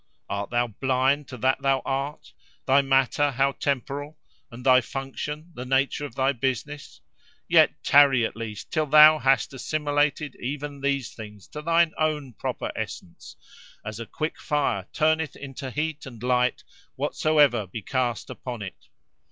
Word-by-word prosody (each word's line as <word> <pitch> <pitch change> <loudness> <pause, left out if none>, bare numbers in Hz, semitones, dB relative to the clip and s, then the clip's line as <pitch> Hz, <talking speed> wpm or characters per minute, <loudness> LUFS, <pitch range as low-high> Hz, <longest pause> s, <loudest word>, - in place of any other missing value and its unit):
Art 100 0 -3
thou 120 0 +1
blind 130 +5 0
to 125 - -8
that 130 +4 +1
thou 135 -1 +1
art—thy 135 0 -1
matter, 135 +1 +2
how 135 +1 +1
temporal; 140 +2 -3 0.3
and 120 +2 -11
thy 130 -1 +6
function, 150 +5 -6
the 125 - -6
nature 135 +3 0
of 120 - -10
thy 135 +1 +2
business? 135 +3 -4 0.5
Yet - - +4
tarry, 140 -4 +6
at - - -5
least, 110 -3 -7
till 155 -1 0
thou 155 +2 +8
hast 135 0 +2
assimilated 145 0 -1
even 140 +2 -5
these 140 -3 -1
things 105 -3 -11
to 150 - -7
thine 165 +1 +3
own 150 -5 -1
proper - - -4
essence, 85 - -7 0.5
as 105 +1 -6
a 115 - -6
quick 155 +1 -4
fire 140 - -1
turneth 160 0 +1
into 135 -1 -7
heat 150 +1 -3
and 120 -3 -11
light 125 0 +1 0.3
whatsoever 145 -9 +2
be 105 +3 -7
cast 125 -2 -2
upon 120 -4 -6
it. 95 - -10
135 Hz, 150 wpm, -25 LUFS, 125-145 Hz, 0.5 s, thou